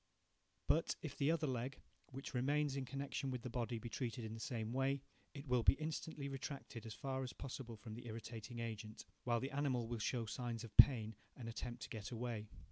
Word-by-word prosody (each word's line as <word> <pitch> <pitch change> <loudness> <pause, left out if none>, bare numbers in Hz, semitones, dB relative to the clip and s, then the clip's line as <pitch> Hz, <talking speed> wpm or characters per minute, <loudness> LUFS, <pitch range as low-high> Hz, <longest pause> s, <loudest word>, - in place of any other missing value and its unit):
But, 165 - +4
if 150 -3 -3
the 140 +1 +3
other 160 -1 +3
leg, 130 0 -1 0.3
which 135 +2 -6
remains 140 +3 +3
in 135 -1 -1
connection 135 0 -2
with 125 -3 -2
the 125 - -3
body, 120 -1 0
be 120 - -5
treated 120 0 -2
in 110 - -4
the 115 - -5
same 115 -1 -2
way, 135 +1 +2 0.3
it 140 0 -6
will 125 -3 +4
be - - +8
instantly 155 -1 -2
retracted 135 -4 -4
as 110 - -5
far 135 -1 -1
as 130 -2 -3
possible 125 -3 -5
from 110 0 -7
the 120 +2 -7
irritating 115 +1 -5
agent, 110 -1 -4 0.2
while 120 -1 +4
the 135 +3 -2
animal 135 -4 +1
will 120 -1 -2
show 115 +2 +1
signs 115 +1 -2
of 115 - -9
pain, 110 -5 +9 0.2
and 120 -3 -6
attempt 120 +1 -4
to - - -5
get 110 -2 -4
away. 115 -3 -2
125 Hz, 210 wpm, -41 LUFS, 115-135 Hz, 0.3 s, pain